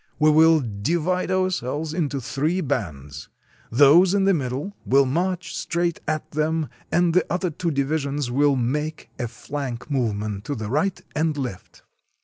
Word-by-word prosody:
We 155 0 +5
will 160 0 +6
di 110 +6 -2
vide 180 +3 0
ourselves 160 -5 -1
into 145 -5 -1
three 150 +8 -1
bands. 75 - -4 0.4
Those 150 - +6
in 200 - +2
the 195 0 +4
middle 145 +6 -3
will 135 +1 +4
march 175 +5 -1
straight 170 0 -1
at 155 0 -2
them, 155 0 0 0.2
and 175 -1 +3
the 180 - +4
other 180 0 0
two 170 +3 -2
divisions 140 -2 -1
will 140 +2 +3
make 150 +5 -2
a 120 - -1
flank 125 +3 -6
movement 105 -6 -1
to 145 - -3
the 110 -2 -5
right 170 +7 0 0.2
and 155 0 0
left. 125 -9 -6
150 Hz, 155 wpm, -23 LUFS, 130-170 Hz, 0.4 s, will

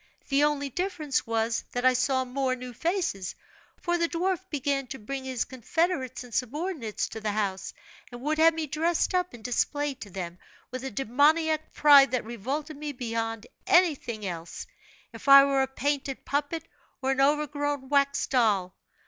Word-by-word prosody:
The 280 +1 +3
only 290 -1 +1
difference 315 -6 -2
was, 225 0 0
that 245 +1 -1
I 255 - +6
saw 260 +1 +1
more 255 0 -1
new 250 -1 -8
faces; 325 - -2 0.4
for 345 -1 0
the 335 0 +1
dwarf 360 +1 0
began 275 -3 -1
to 265 - -6
bring 265 +4 -6
his 260 -3 -2
confederates 260 - -2
and 245 -2 -13
subordinates 265 - -2
to 220 - -7
the 210 -1 -1
house, 200 -3 -2 0.4
and 240 - -8
would 310 +2 0
have 325 0 +6
me 320 -1 -2
dressed 325 +5 0
up 360 0 +1
and 225 - -14
displayed 280 +3 -1
to 205 - -7
them, 180 -2 -6 0.3
with 255 0 -5
a 265 - -3
demoniac 300 +7 +2
pride 285 -2 +7
that 250 -3 0
revolted 275 +7 -4
me 295 0 -5
beyond 225 -3 -3 0.2
everything 270 - +2
else, 170 -2 -6 0.5
if - - -11
I 275 0 +10
were 275 -1 +2
a 265 - +1
painted 275 0 -2
puppet 295 +3 -1 0.4
or 265 - +2
an 270 0 +1
overgrown 290 -1 0
wax 280 -1 +2
doll. 205 -8 +1
270 Hz, 170 wpm, -27 LUFS, 240-300 Hz, 0.5 s, I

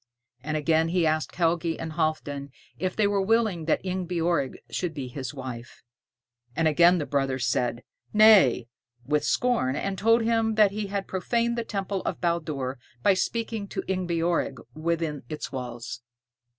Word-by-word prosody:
And 155 +2 -2
again 160 +1 +2
he 170 0 +1
asked 155 0 0
Helgi 170 -1 +1
and 160 -1 -5
Halfdan 155 -3 -2 0.3
if 185 0 -1
they 215 - +2
were 200 -1 +2
willing 210 -5 +1
that 160 - +1
Ingebjorg 175 -6 -1
should 175 -4 -2
be 135 -3 -4
his 130 +1 -5
wife. 130 -4 -8 0.7
And 165 +1 +2
again 170 +4 +5
the 150 - -2
brothers 135 -2 0
said, 120 0 0 0.3
Nay, 210 - +6 0.4
with 150 +3 +1
scorn, 240 - +1
and 195 +5 -3
told 225 +2 +4
him 225 -1 +1
that 210 -2 +5
he 210 0 -3
had 195 0 -3
profaned 235 +5 0
the 235 - -2
temple 195 -3 -3
of - - -3
Baldur 155 -7 -2 0.2
by 200 - +6
speaking 225 +1 -2
to - - -4
Ingebjorg 175 -6 0 0.2
within 160 -2 -2
its 155 - -5
walls. 125 -2 -6
170 Hz, 155 wpm, -26 LUFS, 145-195 Hz, 0.7 s, Nay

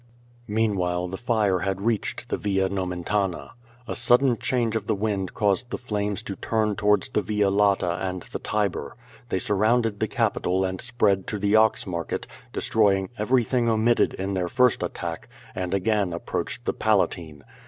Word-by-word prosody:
Meanwhile 95 -5 0
the 95 - -5
fire 110 -6 +1
had 95 0 -2
reached 110 0 -2
the - - -1
Via 95 -2 0
Nomentana. 90 -3 -2 0.4
A - - -3
sudden 120 +1 +4
change 115 0 -1
of 105 -2 -2
the - - +1
wind 100 -2 -2
caused 105 +4 +1
the - - -3
flames 105 -4 -3
to 100 - -5
turn 110 -2 0
towards 105 -1 +2
the - - 0
Via 105 -2 +1
Lata 100 -3 +2
and 90 -1 -3
the - - -7
Tiber. 100 -9 -2 0.3
They - - 0
surrounded 110 +3 +1
the - - +1
Capitol 95 +1 0
and 95 0 -3
spread 105 -6 +1
to 105 - -2
the 100 +1 +2
Ox 110 0 +4
Market, 85 -4 -3 0.3
destroying 100 -3 +2
everything 120 +1 +2
omitted 115 +1 +2
in 95 +1 -3
their 90 -2 -1
first 125 +4 +3
attack, - - -4 0.3
and 90 -1 -3
again 100 -2 +1
approached 85 - -4
the - - 0
Palatine. 75 -5 0
100 Hz, 165 wpm, -25 LUFS, 95-110 Hz, 0.4 s, sudden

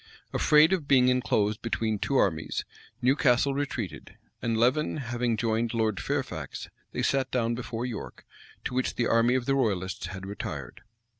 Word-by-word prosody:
[] - - -32
Afraid 155 +4 +5
of 165 -7 -1
being 125 -2 +5
enclosed 110 -4 +1
between 110 -2 -1
two 140 - -1
armies, 80 -9 0 0.4
Newcastle 135 0 +3
retreated; 135 - -4 0.2
and 115 -1 0
Leven 130 +8 +2
having 120 -3 -1
joined 115 +1 0
Lord 110 -3 +1
Fairfax, - - -4 0.2
they - - -2
sat 135 -1 +1
down 120 -2 0
before 120 0 -4
York, 120 -4 -7 0.4
to - - -3
which 130 0 0
the 120 - +1
army 115 +2 +3
of 130 -2 0
the 135 - +2
royalists 95 -9 -1
had 95 +1 -7
retired. 75 -10 -6
120 Hz, 160 wpm, -28 LUFS, 110-130 Hz, 0.4 s, Afraid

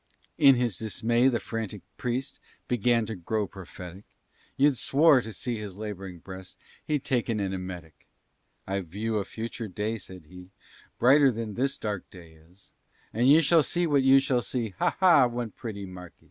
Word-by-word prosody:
In 135 -1 +7
his 120 -6 0
dismay, 115 +3 +1
the 120 -3 +2
frantic 105 -2 -5
priest 125 +2 -3 0.3
Began 120 -1 +2
to 110 0 -5
grow 105 +4 -2
prophetic; 95 0 -10 0.5
You'd 140 -3 +3
swore, 145 0 +4
to 110 - -8
see 120 +3 -4
his 105 -3 -7
laboring 95 -4 -6
breast, 95 +2 -11 0.3
He'd 150 -3 -1
taken 120 -3 0
an 95 -1 -2
emetic. 90 -6 -8 0.6
"I 100 +1 -2
view 105 +5 -3
a - - -1
future 115 +2 -6
day," 105 +4 -3
said 90 -3 -11
he, 90 +3 -13 0.5
"Brighter 135 +3 +5
than 115 -2 -5
this 135 +5 -1
dark 105 -3 -4
day 85 -3 -14
is; 80 +4 -22 0.4
And 120 +4 +3
you 155 +3 +7
shall 165 +2 +5
see 175 +3 0
what 145 -4 +3
you 135 +1 +6
shall 130 -2 +1
see, 120 -1 -3
Ha! - - +1
ha! 170 -9 +6
one 120 -2 -4
pretty 100 -3 -7
Marquis! 90 -2 -11
110 Hz, 175 wpm, -27 LUFS, 95-125 Hz, 0.6 s, In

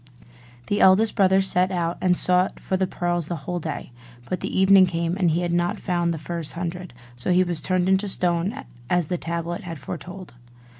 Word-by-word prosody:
The 205 - 0
eldest 195 +4 +5
brother 190 -2 +4
set 185 -1 +2
out, 175 -2 -2
and 180 -1 +3
sought 180 +1 +2
for 190 - -2
the 190 0 0
pearls 175 -3 -2
the 175 - -3
whole 180 0 -2
day: 155 -5 -6 0.4
but 185 - -2
the - - -2
evening 190 -1 +6
came, 170 0 -2
and 185 -3 +2
he 165 +2 +1
had 175 -1 -1
not 175 0 0
found 175 -2 0
the 165 - -3
first 165 0 -5
hundred: 180 +1 -5 0.2
so 120 - -4
he 180 +1 +4
was 175 -3 -2
turned 185 -1 0
into 190 +2 +2
stone 180 +8 -1 0.3
as 175 -3 +1
the 180 - -2
tablet 170 +1 -4
had 165 -2 -7
foretold. 180 +5 -8
180 Hz, 200 wpm, -23 LUFS, 170-185 Hz, 0.4 s, evening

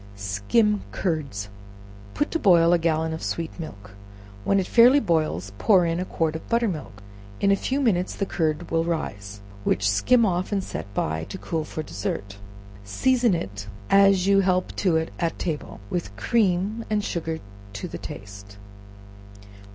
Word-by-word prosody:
Skim 105 - +1
Curds. 140 - -2 0.7
Put 295 - 0
to 330 - 0
boil 175 - +5
a 175 - +4
gallon 160 -1 0
of 160 - -5
sweet 165 +1 -4
milk; 100 -10 -8 0.5
when 195 - +2
it 190 - 0
fairly 245 +7 +6
boils, 155 - 0
pour 190 -5 +5
in 165 +1 0
a 180 - -2
quart 160 -3 -1
of 160 - -8
butter 235 0 +2
milk; 145 - -6 0.4
in 200 - +3
a - - +5
few 260 +7 -1
minutes 190 -9 +1
the 200 - -1
curd 160 -2 -2
will 165 0 +2
rise, 100 -12 -4 0.2
which 100 +1 +1
skim 230 - +4
off 185 -1 -1
and 195 -2 0
set 100 - -6
by, 80 +1 -1
to - - -7
cool 165 -4 -3
for 155 - -5
dessert; 100 - -5 0.5
season 240 - +2
it 100 - -5 0.2
as 195 -2 +5
you 200 0 +5
help 185 -1 +1
to 180 -4 +2
it 160 0 -3
at 165 -2 -1
table, 160 -4 -4
with 170 - -3
cream 205 - +1
and 210 -1 0
sugar 165 -4 -3 0.4
to 105 - -5
the - - -7
taste. 100 0 -10
170 Hz, 165 wpm, -24 LUFS, -, 0.7 s, fairly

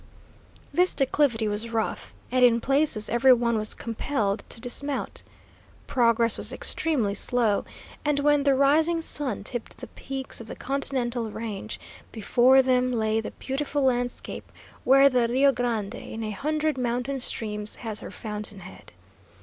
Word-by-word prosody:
This 360 +4 +2
declivity 260 -5 +1
was 210 +2 -2
rough, 100 - -3 0.2
and 255 0 +3
in 235 -1 +5
places 270 -4 +1
every 240 +3 +5
one 235 -1 +1
was 215 -1 -2
compelled 225 -3 -2
to - - -5
dismount. 275 +4 -3 0.6
Progress 230 -2 +2
was - - +3
extremely 255 -11 -1
slow, 225 -2 +2 0.4
and 295 -1 +1
when 295 0 +3
the 280 -1 +3
rising 315 +5 +3
sun 265 -11 -1
tipped 240 +2 -6
the - - -8
peaks 270 -3 -5
of 225 - -10
the - - -7
Continental 250 -4 -2
Range, 215 -1 -6 0.3
before 250 +4 +4
them 255 -1 +2
lay 220 -2 0
the - - -5
beautiful 285 +1 -3
landscape 245 -2 -2 0.3
where 275 +2 +6
the 250 -3 +2
Rio 265 +4 +4
Grande 235 -5 -2
in 225 -2 -7
a 215 - -3
hundred 305 +5 -1
mountain 250 +3 -2
streams 210 -3 -4
has 220 -3 -5
her - - -8
fountain 210 -2 -6
head. 185 +1 -13
245 Hz, 150 wpm, -26 LUFS, 220-275 Hz, 0.6 s, where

